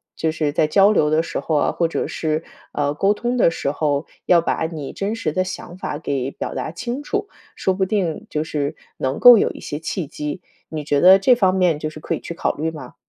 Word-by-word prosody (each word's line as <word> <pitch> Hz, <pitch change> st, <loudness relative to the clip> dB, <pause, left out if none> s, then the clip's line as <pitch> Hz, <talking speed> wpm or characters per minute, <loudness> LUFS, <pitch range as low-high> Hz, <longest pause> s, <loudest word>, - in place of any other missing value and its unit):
就 160 Hz, -, 0 dB
是 155 Hz, -2 st, -1 dB
在 155 Hz, -, +2 dB
交 195 Hz, +6 st, +5 dB
流 150 Hz, -8 st, +3 dB
的 155 Hz, +1 st, +2 dB
时 -, -, -4 dB
候 160 Hz, -, -1 dB
啊， 145 Hz, -, +2 dB
或 170 Hz, -, +1 dB
者 165 Hz, -, -2 dB
是， 155 Hz, 0 st, -2 dB, 0.3 s
呃， 145 Hz, -1 st, 0 dB
沟 195 Hz, +7 st, +2 dB
通 240 Hz, +3 st, -2 dB
的 230 Hz, -, +5 dB
时 140 Hz, -, -2 dB
候， 145 Hz, 0 st, -1 dB, 0.2 s
要 175 Hz, -2 st, +5 dB
把 165 Hz, -, -1 dB
你 155 Hz, -4 st, -7 dB
真 205 Hz, +3 st, -2 dB
实 190 Hz, -9 st, -2 dB
的 185 Hz, -, +1 dB
想 185 Hz, -1 st, -7 dB
法 150 Hz, -, -4 dB
给 135 Hz, -4 st, -2 dB
表 -, -, -5 dB
达 -, -, -3 dB
清 240 Hz, -, -4 dB
楚， 415 Hz, +6 st, -2 dB, 0.3 s
说 190 Hz, -, 0 dB
不 190 Hz, +1 st, -1 dB
定 185 Hz, -5 st, -2 dB
就 150 Hz, -, -1 dB
是 145 Hz, -2 st, -3 dB, 0.2 s
能 130 Hz, +1 st, -2 dB
够 245 Hz, -1 st, +10 dB
有 -, -, +2 dB
一 -, -, -11 dB
些 145 Hz, -, -5 dB
契 165 Hz, +2 st, -3 dB
机， 150 Hz, +3 st, -5 dB, 0.3 s
你 155 Hz, -2 st, -4 dB
觉 145 Hz, -1 st, +1 dB
得 185 Hz, +2 st, +9 dB
这 250 Hz, +6 st, +5 dB
方 190 Hz, -5 st, +2 dB
面 180 Hz, -5 st, +2 dB
就 155 Hz, -, -3 dB
是 155 Hz, -, -11 dB
可 -, -, -3 dB
以 -, -, -6 dB
去 -, -, -6 dB
考 -, -, 0 dB
虑 160 Hz, +2 st, -2 dB
吗？ 145 Hz, -6 st, -10 dB
160 Hz, 260 characters per minute, -21 LUFS, 150-190 Hz, 0.3 s, 够